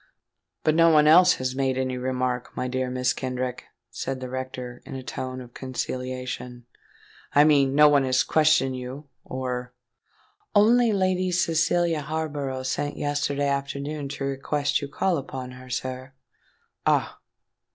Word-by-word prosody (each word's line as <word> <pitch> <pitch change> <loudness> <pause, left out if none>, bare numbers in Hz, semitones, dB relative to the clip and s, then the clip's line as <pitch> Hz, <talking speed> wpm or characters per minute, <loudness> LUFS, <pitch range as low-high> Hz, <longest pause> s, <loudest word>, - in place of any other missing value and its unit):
"But 155 - +3
no 165 +1 +5
one 150 -2 +5
else 180 +3 +7
has 130 0 -3
made 135 -1 0
any 130 -1 -1
remark, 125 -1 -2
my 125 - -1
dear 130 0 -2
Mrs. 125 0 0
Kenrick?" 125 -1 -4 0.3
said 135 -1 -4
the 130 -1 -6
rector, 130 -1 -6
in - - -8
a 130 - -6
tone 130 0 -5
of 125 -1 -11
conciliation 125 -1 -5 0.7
"I 145 - +8
mean—no 145 -1 +5
one 145 -2 +4
has 130 0 +3
questioned 155 -4 +3
you—or——" 125 -1 -6 0.8
"Only 230 +3 +5
Lady 185 -2 +1
Cecilia 170 -1 +1
Harborough 145 -3 -3
sent 145 +3 -2
yesterday 145 -1 -1
afternoon 140 +1 -3
to 140 0 -5
request 140 +2 -1
you 145 - -4
to - - -22
call 185 +1 +1
upon 130 -2 -7
her, 125 0 -12
sir." 130 +1 -4 0.7
"Ah! - - +1
135 Hz, 140 wpm, -25 LUFS, 130-150 Hz, 0.8 s, I